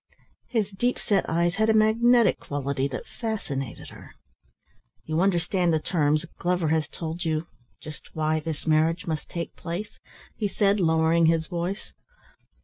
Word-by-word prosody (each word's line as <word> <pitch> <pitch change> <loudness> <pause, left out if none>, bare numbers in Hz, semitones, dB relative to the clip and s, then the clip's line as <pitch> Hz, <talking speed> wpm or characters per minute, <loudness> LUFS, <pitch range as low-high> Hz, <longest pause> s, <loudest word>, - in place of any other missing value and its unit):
His 215 -4 -1
deep 240 +6 0
set 200 -3 0
eyes 170 +2 +1
had 220 0 +3
a 220 - +4
magnetic 230 +2 +4
quality 140 -1 -2
that - - -6
fascinated 145 - -4
her. - - -14 0.9
"You 155 +2 0
understand 180 -1 +2
the 160 - +2
terms? 155 -2 +1
Glover 175 -2 +1
has 155 -2 +1
told 165 +1 -5
you 160 -1 -1 0.3
just 155 0 -11
why 155 0 +1
this 155 -1 -5
marriage 160 +2 +2
must 160 -2 -4
take 170 -1 -5
place?" 175 +6 -6 0.4
he 210 - -1
said, 200 0 +2
lowering 160 -1 +3
his 165 -1 +2
voice. 175 +5 -4
170 Hz, 145 wpm, -26 LUFS, 155-195 Hz, 0.9 s, a